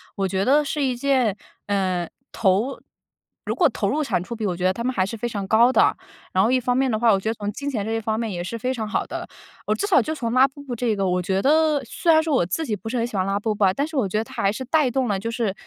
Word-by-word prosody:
我 195 -1 0
觉 190 +1 -1
得 290 +3 +4
是 295 +1 -3
一 255 -2 0
件， 250 -5 +1 0.3
呃， 185 -4 0 0.2
投 215 +5 +1 0.6
如 - - -3
果 - - +4
投 - - -2
入 310 - 0
产 180 -10 -1
出 235 +5 -6
比， 220 -1 -4
我 180 -3 -1
觉 180 - -5
得 185 - +4
它 235 +5 -5
们 255 +1 -1
还 185 - +1
是 225 +3 -6
非 240 - -2
常 205 -4 -4
高 235 +5 +5
的。 - - +4 0.3
然 185 - +2
后 230 - +2
一 255 - +3
方 250 0 0
面 265 0 +2
的 220 - 0
话， 235 -2 +4
我 195 - +3
觉 190 - -6
得 - - 0
从 205 -2 -4
金 280 +7 -6
钱 225 -7 -2
这 220 - -4
一 225 - 0
方 220 0 -2
面 225 -3 -2
也 175 -1 -4
是 230 - -5
非 250 +3 -2
常 220 -4 -4
好 210 - -1
的。 - - -6 0.4
哦， - - +1
至 405 - -2
少 390 - +5
就 315 - -3
从 235 -7 -3
拉 255 +2 +5
布 280 +2 -13
布 260 -4 -5
这 235 -2 0
个， 195 -1 0
我 180 0 +1
觉 190 +1 0
得 305 +1 +3
虽 325 +7 +1
然 315 - +5
说 315 -3 0
我 175 - +2
自 190 - -2
己 215 - 0
不 215 +3 -10
是 245 - -2
很 230 - +1
喜 215 -5 -5
欢 185 - +1
拉 195 +1 0
布 215 +1 -1
布 205 - +2
啊， 185 - +3
但 280 +8 -1
是 320 - -6
我 240 -7 +2
觉 190 - -6
得 - - -1
它 225 - -6
还 195 - +3
是 240 +5 -5
带 285 -1 +2
动 260 0 0
了 200 -3 0
就 230 +4 -4
是 225 -4 -1
230 Hz, 345 characters per minute, -23 LUFS, 200-265 Hz, 0.6 s, 高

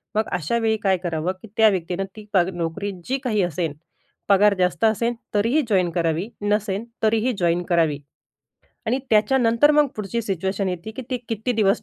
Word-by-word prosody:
मग 215 +1 +1
अशावेळी 220 +6 0
काय 190 -2 +3
करावं, 170 0 -2
की 225 - -11
त्या 220 -1 +7
व्यक्तीनं 185 0 -2
ती 215 -1 -10
पग 180 -2 +3
नोकरी 175 +4 -3
जी 265 - 0
काही 215 -5 +1
असेन, 165 -2 -2 0.6
पगार 205 +1 +5
जास्त 180 0 +1
असेन, 230 +2 +2 0.2
तरीही 230 +9 +2
जॉइन 185 -4 +3
करावी 165 +3 -1
नसेन, 205 0 0 0.2
तरीही 225 +3 +2
जॉइन 175 0 +1
करावी 165 -5 +2 0.9
आणि 245 +4 +1
त्याच्यानंतर 230 +4 +4
मग 300 -1 +4
पुढची 215 +3 -3
सिच्युएशन 190 0 -2
येते, 180 +3 -5
की 235 +4 -7
ती 255 - 0
किती 225 +2 -1
दिवस 205 -4 +2
205 Hz, 170 wpm, -23 LUFS, 180-225 Hz, 0.9 s, त्या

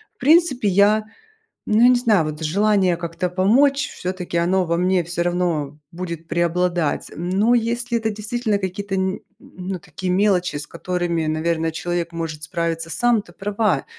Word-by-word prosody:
в - - -47
принципе 295 -5 +3
я, 205 +3 +4 0.6
ну, 215 +1 +2
я 245 - +8
не 250 - +6
знаю, 215 -9 +3
вот 155 +1 -5
желание 190 +2 +2
как-то 170 +1 -3
помочь 270 +10 +3
всё-таки 180 -1 -5
оно 180 +2 +2
во 170 0 0
мне 180 +1 +2
всё 170 +1 -3
равно 170 -5 -1
будет 170 -2 -6
преобладать. 170 -1 0
Но 190 +8 +1
если 235 0 0
это 220 -1 -1
действительно 215 0 -2
какие-то 195 +1 -4
н 190 0 -1 0.2
ну, 185 +1 -7
такие 180 +3 -4
мелочи, 185 -4 +2
с 145 - -5
которыми, 170 -2 -2
наверное, 160 +1 0
человек 170 +1 -3
может 160 -2 -5
справиться 165 0 -3
сам. 225 +8 +2
Ты 210 - -15
права, 205 -6 0
180 Hz, 160 wpm, -21 LUFS, 170-210 Hz, 0.6 s, я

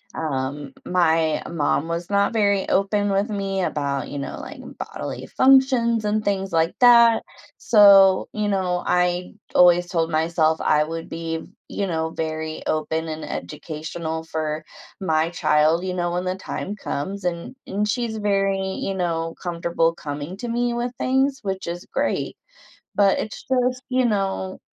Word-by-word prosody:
um 140 -2 -3
my 160 -3 +2
mom 155 -1 0
was 170 +1 -4
not 200 +2 +2
very 200 -3 +2
open 205 +1 +1
with 200 +3 +1
me 195 -2 -2
about, 140 -5 -2
you 145 - -5
know, 140 - -5
like, - - -9 0.2
bodily - - -6
functions 260 -4 +4
and 210 +1 0
things 195 -1 -1
like 165 0 +1
that. 235 -2 +7 0.3
So, 195 -3 +6
you 210 -1 -1
know, 185 -3 0
I 180 0 +1 0.2
always 175 0 +6
told 165 -2 -1
myself 160 0 +1
I 150 0 +3
would 165 +1 -5
be, 165 0 -4 0.2
you 200 - -2
know, 160 -2 -1
very 155 -1 -4
open 160 +1 -1
and 155 0 -5
educational 160 - -5
for 155 -1 -3 0.3
my 160 -4 +1
child, 160 +1 +2
you 185 - -2
know, 175 -1 -1
when 180 +1 -2
the 185 0 -1
time 195 +1 -5
comes 195 +1 -4
and 175 +7 -3
and 205 +2 -1
she's 225 0 -2
very, 195 -2 +1 0.2
you 195 - -2
know, 165 -3 -2
comfortable 170 -1 0
coming 145 +3 -6
to 240 +3 -5
me 240 +1 0
with 240 +1 -2
things, 265 +1 +1
which 190 -1 -3
is 175 +1 -5
great. - - -1 0.6
But 200 -1 +4
it's 210 - -6
just, 255 -1 0
you 255 0 +1
know, 195 -4 -1
180 Hz, 155 wpm, -23 LUFS, 160-205 Hz, 0.6 s, that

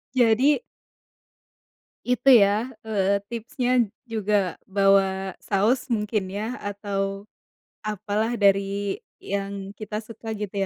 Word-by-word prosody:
Jadi 255 - +4 1.5
itu 250 +2 +2
ya, 210 +5 +1 0.2
eee, 200 -2 +2
tipsnya 240 0 0 0.2
juga 210 -5 0
bawa 195 -1 +3
saus 225 +8 +1
mungkin 210 -3 -1
ya, 215 +5 -3
atau, 200 -1 -3 0.6
apa 210 -1 -5
lah 225 +2 +1
dari 200 -1 +2 0.3
yang 200 0 -4
kita 210 +1 -6
suka 225 0 -7
gitu 210 -2 -5
205 Hz, 100 wpm, -25 LUFS, 195-225 Hz, 1.5 s, Jadi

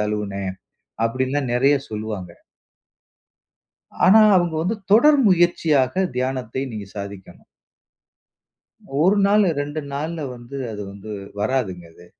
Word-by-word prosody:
தழுவுனேன். 100 -2 -3 0.5
அப்படின்னுலாம் 130 +3 -1
நெறய 135 +4 +4
சொல்லுவாங்க. 105 -4 -5 1.8
ஆனா, 215 +4 +7 0.2
அவுங்க 175 -3 +1
வந்து 190 +7 -1 0.2
தொடர் 290 +8 +6
முயற்சியாக 175 -3 +2
தியானத்தை 130 -1 -2
நீங்க 105 -3 -7
சாதிக்கணும். 100 -3 -9 1.6
1 190 +5 +4
நாளு, 205 0 +4
2 145 +2 -4
நாள்ல 155 +3 -4
வந்து, 120 +3 -10
அது 105 -1 -6
வந்து 100 +2 -10 0.3
வராதுங்க, 105 -7 -2
அது. 85 - -17
130 Hz, 105 wpm, -22 LUFS, 105-165 Hz, 1.8 s, ஆனா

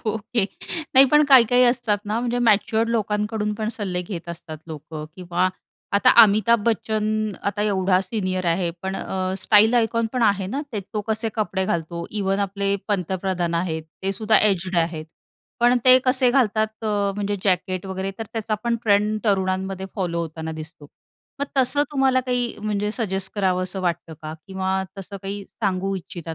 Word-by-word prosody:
Okay 220 0 0 0.5
नाही 265 +1 +10
पण 300 0 +6
काही-काही 250 -2 +6
असतात 240 -4 +1
ना 215 +2 -1
म्हणजे 245 0 -1
मॅच्युअर्ड 225 0 +2
लोकांकडून 210 -1 -1
पण 215 +1 -3
सल्ले 185 -5 -3
घेत 175 -2 -7
असतात 165 -2 -8
लोकं 155 -1 -7
किंवा 180 0 0 0.4
आता 205 +6 +5
अमिताभ 215 +2 +4
बच्चन 215 -1 0
आता 205 +1 -1
एवढा 190 -3 +2
सीनियर 185 -2 -3
आहे 170 +1 +1
पण 190 0 -3
अ, 185 0 -3
स्टाईल 220 +3 +5
आयकॉन 230 0 +2
पण 250 -2 0
आहे 200 -3 +2
ना 265 +9 -3
ते. 210 - -2
तो 210 +2 -5
कसे 220 +1 -1
कपडे 200 -3 -1
घालतो. 170 -1 -3
इव्हन 195 -2 -1
आपले 200 0 -1
पंतप्रधान 185 -2 -1
आहेत 170 -2 -1 0.2
ते 195 +1 0
सुद्धा 215 +2 +3
एज्ड 190 -3 +1
आहेत. 165 -2 0 0.6
पण 245 +1 +5
ते 255 0 +9
कसे 255 -1 +3
घालतात 220 -3 +1
अ, 205 -2 0
म्हणजे 205 0 -2
जॅकेट 185 0 +1
वगैरे 190 +1 -3
तर 225 - -3
त्याचा 225 -1 -2
पण 235 0 +1
ट्रेंड 210 0 +2
तरुणांमध्ये 190 -1 0
फॉलो 175 -4 -2
होताना 160 0 -6
दिसतो. 155 -1 -10 0.5
मग 285 - 0
तसं 265 +3 +3
तुम्हाला 265 -2 +3
काही 245 -2 -1
म्हणजे 210 -1 -1
सजेस्ट 190 -3 -2
करावंस 185 -2 0
वाटतं 175 -3 -2
का? 155 0 -6
किंवा 190 0 -1 0.2
तसं 195 +1 -7
काही 200 +1 -5
सांगू 195 -2 -2
इच्छिता 170 -3 -7
200 Hz, 165 wpm, -23 LUFS, 185-220 Hz, 0.6 s, नाही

